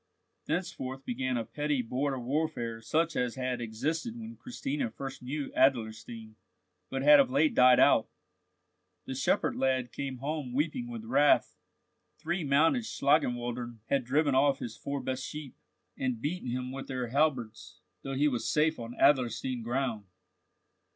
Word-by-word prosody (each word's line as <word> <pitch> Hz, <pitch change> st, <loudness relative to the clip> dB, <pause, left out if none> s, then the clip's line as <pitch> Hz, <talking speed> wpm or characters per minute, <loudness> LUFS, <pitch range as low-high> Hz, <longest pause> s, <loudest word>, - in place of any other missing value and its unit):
Thenceforth 135 Hz, -6 st, -3 dB
began 130 Hz, +1 st, -1 dB
a 115 Hz, -, -2 dB
petty 145 Hz, -2 st, -1 dB
border 135 Hz, +4 st, -1 dB
warfare 120 Hz, -4 st, -2 dB
such 160 Hz, +7 st, 0 dB
as 125 Hz, -2 st, -1 dB
had 125 Hz, -2 st, -2 dB
existed 155 Hz, -, -3 dB
when 230 Hz, 0 st, -8 dB
Christina 270 Hz, +1 st, -3 dB
first 135 Hz, -, -7 dB
knew 140 Hz, +3 st, -4 dB
Adlerstein, 115 Hz, -3 st, 0 dB, 0.6 s
but 135 Hz, 0 st, -2 dB
had 150 Hz, 0 st, +8 dB
of 140 Hz, -, +4 dB
late 145 Hz, +4 st, +3 dB
died 125 Hz, 0 st, +6 dB
out. -, -, +5 dB, 1.0 s
The -, -, -5 dB
shepherd 135 Hz, +1 st, +1 dB
lad 130 Hz, -2 st, 0 dB
came 135 Hz, -2 st, -4 dB
home 140 Hz, -1 st, -4 dB
weeping 170 Hz, -, -1 dB
with 230 Hz, -2 st, -7 dB
wrath. 145 Hz, -11 st, +3 dB, 0.6 s
Three 170 Hz, +2 st, -2 dB
mounted 155 Hz, -, +3 dB
Schlangenwaldern 120 Hz, -, 0 dB
had 140 Hz, -2 st, +2 dB
driven 145 Hz, +3 st, +2 dB
off 135 Hz, +1 st, +4 dB
his 115 Hz, -4 st, -6 dB
four 140 Hz, +3 st, -4 dB
best 130 Hz, 0 st, -3 dB
sheep, 150 Hz, -2 st, -7 dB, 0.4 s
and 130 Hz, -3 st, -2 dB
beaten 145 Hz, +1 st, -3 dB
himself 125 Hz, +1 st, -3 dB
with 135 Hz, 0 st, -6 dB
their 130 Hz, -2 st, -3 dB
halberds, 130 Hz, -5 st, -1 dB, 0.2 s
though 135 Hz, 0 st, -4 dB
he 145 Hz, +3 st, +3 dB
was 125 Hz, -5 st, -1 dB
safe 155 Hz, +1 st, +2 dB
on 115 Hz, +1 st, -7 dB
Adlerstein 125 Hz, -2 st, +2 dB
ground. 120 Hz, -3 st, -2 dB
135 Hz, 150 wpm, -30 LUFS, 125-150 Hz, 1.0 s, had